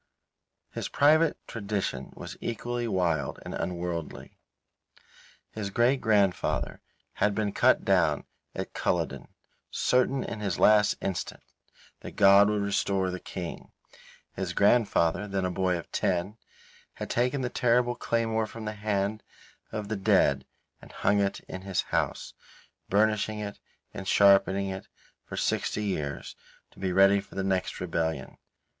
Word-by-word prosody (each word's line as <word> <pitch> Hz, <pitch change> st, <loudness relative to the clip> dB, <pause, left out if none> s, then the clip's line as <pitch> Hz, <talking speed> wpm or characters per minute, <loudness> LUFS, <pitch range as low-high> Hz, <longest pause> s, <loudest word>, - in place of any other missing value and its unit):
His -, -, -4 dB
private 155 Hz, +2 st, +4 dB
tradition 100 Hz, -, -3 dB
was -, -, -8 dB
equally 120 Hz, +1 st, -3 dB
wild 85 Hz, -9 st, 0 dB
and -, -, -6 dB
unworldly. 85 Hz, -2 st, -4 dB, 1.2 s
His 105 Hz, -2 st, -4 dB
great 125 Hz, +5 st, +2 dB
grandfather 100 Hz, -5 st, +1 dB, 0.4 s
had 105 Hz, 0 st, +3 dB
been 105 Hz, -2 st, 0 dB
cut -, -, +3 dB
down -, -, +2 dB, 0.3 s
at -, -, -5 dB
Culloden, -, -, -1 dB, 0.4 s
certain 130 Hz, +1 st, +1 dB
in -, -, -5 dB
his 100 Hz, -2 st, -2 dB
last 105 Hz, -1 st, +5 dB
instant 95 Hz, -2 st, -4 dB, 0.6 s
that -, -, -10 dB
God 100 Hz, 0 st, +7 dB
would 105 Hz, -1 st, 0 dB
restore 100 Hz, -2 st, 0 dB
the 90 Hz, -, -5 dB
King. 90 Hz, -2 st, -7 dB, 0.6 s
His 90 Hz, -2 st, -3 dB
grandfather, 100 Hz, -2 st, +3 dB
then 100 Hz, -2 st, -1 dB
a 90 Hz, -, -1 dB
boy 90 Hz, 0 st, 0 dB
of 85 Hz, -, -9 dB
ten, 95 Hz, +3 st, -1 dB, 0.6 s
had -, -, -6 dB
taken 125 Hz, +3 st, +1 dB
the 125 Hz, -, -1 dB
terrible 120 Hz, 0 st, +2 dB
claymore 115 Hz, -2 st, -1 dB
from 110 Hz, 0 st, -8 dB
the 105 Hz, -, -3 dB
hand 105 Hz, 0 st, -1 dB, 0.5 s
of 105 Hz, -1 st, -4 dB
the 110 Hz, -, -2 dB
dead 70 Hz, -8 st, +2 dB, 0.3 s
and -, -, -14 dB
hung 100 Hz, +1 st, +1 dB
it 100 Hz, -1 st, 0 dB
up -, -, -29 dB
in 95 Hz, -, -7 dB
his 95 Hz, -1 st, -1 dB
house, -, -, -1 dB, 0.6 s
burnishing 110 Hz, +1 st, +2 dB
it 105 Hz, -1 st, -6 dB, 0.3 s
and 95 Hz, -, -7 dB
sharpening 100 Hz, 0 st, +4 dB
it 95 Hz, 0 st, -6 dB, 0.4 s
for -, -, -7 dB
sixty 105 Hz, -, -1 dB
years, 75 Hz, -8 st, -3 dB, 0.4 s
to -, -, -18 dB
be 95 Hz, -1 st, -1 dB
ready 95 Hz, +2 st, +5 dB
for 100 Hz, -, -12 dB
the 95 Hz, -, -1 dB
next 95 Hz, -1 st, -1 dB
rebellion. 80 Hz, -6 st, -3 dB
100 Hz, 140 wpm, -28 LUFS, 95-110 Hz, 1.2 s, God